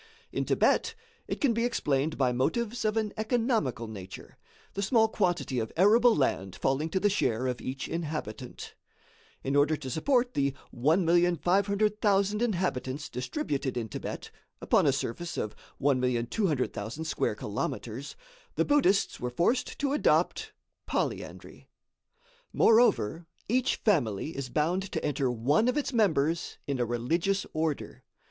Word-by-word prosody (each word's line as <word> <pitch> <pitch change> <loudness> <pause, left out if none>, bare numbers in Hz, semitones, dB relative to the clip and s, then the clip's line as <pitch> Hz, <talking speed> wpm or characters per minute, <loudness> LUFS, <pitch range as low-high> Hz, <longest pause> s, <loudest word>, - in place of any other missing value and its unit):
In - - -2
Thibet 455 - +2 0.3
it - - -3
can 275 -5 +3
be 230 +1 0
explained 150 - 0
by 130 -2 +2
motives 220 - -1
of 215 +1 +1
an 215 -2 -1
economical 220 - 0
nature; 100 -4 -9 0.4
the 200 - -3
small 220 +2 +4
quantity 175 - 0
of 110 -1 -3
arable 225 +6 +5
land 95 -9 0
falling 140 +4 0
to 190 - 0
the 205 - +3
share 130 - 0
of 125 -2 -2
each 135 +1 -4
inhabitant. 150 -8 -5 0.7
In 135 +1 -1
order 145 +2 +3
to 130 -3 -6
support 245 - +1
the 140 -1 0 0.2
1,500,000 195 - +2
inhabitants 155 - -1
distributed 135 - -3
in 115 -2 -3
Thibet, - - -6 0.3
upon - - +3
a - - +5
surface 170 +9 -4
of 105 - -3 0.2
1,200,000 130 - 0
square - - -1
kilometres, - - -4 0.4
the - - +2
Buddhists 210 -10 +2
were 125 - -2
forced 175 - 0
to 280 -1 0
adopt 295 - +1 0.4
polyandry. - - -4 0.8
Moreover, 175 - +3 0.2
each 255 +3 +2
family 150 - 0
is 135 -2 -4
bound 165 +7 +1
to - - -2
enter 140 -3 0
one 130 - +2
of 250 - +1
its 285 -2 -1
members 170 -7 +1
in 140 -2 -2
a 120 - +2
religious 165 - 0
order. 155 -2 -3
160 Hz, 135 wpm, -29 LUFS, 130-210 Hz, 0.8 s, arable